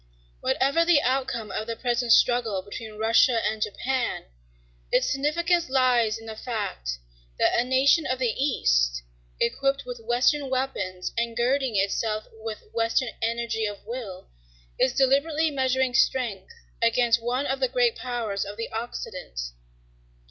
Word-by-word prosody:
Whatever 275 - +2
the 335 -3 +5
outcome 250 -4 -1
of 215 - -3
the 230 - -3
present 240 0 0
struggle 225 -6 +3
between 215 +2 -8
Russia 230 +2 +4
and 215 0 -1
Japan, 250 +4 -2 0.7
its - - +3
significance 335 +4 +1
lies 245 -4 +3
in 225 - -12
the 220 -1 -7
fact 205 - -4 0.4
that - - +3
a - - +3
nation 265 +5 +3
of 255 - 0
the 250 -3 +1
East, - - +1 0.4
equipped 275 - 0
with 245 -1 -6
Western 250 +5 +1
weapons 205 -9 -2
and 235 -1 -2
girding 255 0 +1
itself 215 +2 0
with 220 -1 -6
Western 230 +2 +1
energy 230 -1 -1
of 205 -1 -8
will, 220 -5 -7 0.5
is 260 - +3
deliberately 295 +4 +2
measuring 260 -2 +1
strength 235 -6 +1 0.3
against 230 0 +3
one 250 +4 -1
of 270 -1 -1
the - - +2
great 485 -1 +2
powers 235 - -3
of 200 +1 -8
the 230 - -5
Occident. 220 - -6
240 Hz, 140 wpm, -26 LUFS, 220-265 Hz, 0.7 s, the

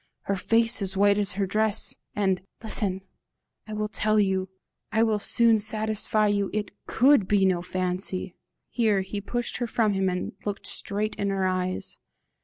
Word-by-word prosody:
her 200 - -2
face 225 +4 +2
as 190 -1 -2
white 200 +1 +4
as 200 -3 0
her 195 +1 -1
dress! 215 +2 +1 0.2
And 190 -3 0 0.2
listen! 200 -4 +1 0.7
I 215 - -7
will 215 0 -2
tell 215 0 +1
YOU 190 -2 0 0.4
I 220 - +2
will 220 -2 +1
soon 230 +2 +4
satisfy 215 0 0
you 205 -1 0
it 210 -1 -3 0.2
COULD 260 -5 +4
be 200 -1 +3
no 180 -2 +1
fancy." 185 0 -3 0.4
Here 215 -5 +1
he 200 +2 -5
pushed 240 +4 -3
her 240 - -2
from 220 -2 +1
him 190 -1 0
and 180 0 -3
looked 205 -1 -5
straight 215 +1 -1
in 200 - -1
her 195 -1 -1
eyes. 185 0 -2
205 Hz, 170 wpm, -26 LUFS, 190-215 Hz, 0.7 s, white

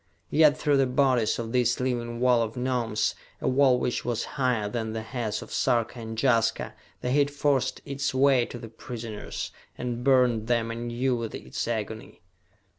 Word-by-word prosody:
Yet 155 -1 +5
through 145 -2 +2
the 135 -1 +3
bodies 125 -4 +2
of 115 -1 -4
this 125 -1 +2
living 120 -2 -2
wall 125 -1 +4
of 115 +1 -3
Gnomes, 120 -4 0 0.3
a - - -2
wall 130 -1 +4
which 125 - -1
was 120 -2 -1
higher 125 -6 +1
than 110 0 -3
the 110 0 -4
heads 115 -2 -3
of - - -11
Sarka 120 -1 +1
and 110 -1 -6
Jaska, 115 -4 +2 0.3
the 125 - -1
heat 145 +1 +3
forced 145 -2 0
its 140 0 -2
way 130 -2 +4
to - - -7
the 115 - -8
prisoners, 115 -1 -6 0.3
and 120 -1 -3
burned 125 -4 +3
them 115 -1 +1
anew 120 +2 -1
with 115 -2 -4
its - - -5
agony. 110 -4 -5
120 Hz, 175 wpm, -27 LUFS, 115-130 Hz, 0.3 s, Yet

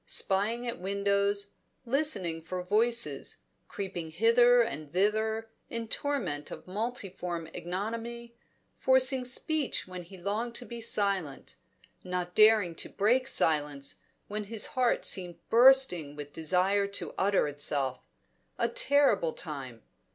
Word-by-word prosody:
Spying 215 +5 +1
at 235 - -4
windows, 200 +1 0 0.3
listening 230 - +1
for 180 +3 -5
voices, 230 +5 +1 0.3
creeping 180 -5 -5
hither 235 +7 +5
and 155 -10 -6
thither 220 +4 0 0.2
in 230 -1 -4
torment 210 - -2
of - - -9
multiform 185 -5 -4
ignominy, 230 +6 -5 0.5
forcing 260 0 +4
speech 290 +1 -1
when 180 -1 -7
he 185 +2 -13
longed 215 +6 -3
to 245 - -6
be 235 -1 -8
silent, 200 -10 -1 0.5
not 180 -1 -4
daring 215 -4 +5
to - - -5
break 245 +6 +1
silence 145 - 0 0.3
when 210 0 -4
his 220 +1 +2
heart 250 -2 +1
seemed 175 -3 0
bursting 235 - +5
with 145 -1 -9
desire 185 +5 +2
to 200 - -4
utter 195 -5 +2
itself 145 -2 -1 0.6
a - - +1
terrible 285 - +2
time. 135 -8 -7
200 Hz, 120 wpm, -29 LUFS, 175-235 Hz, 0.6 s, hither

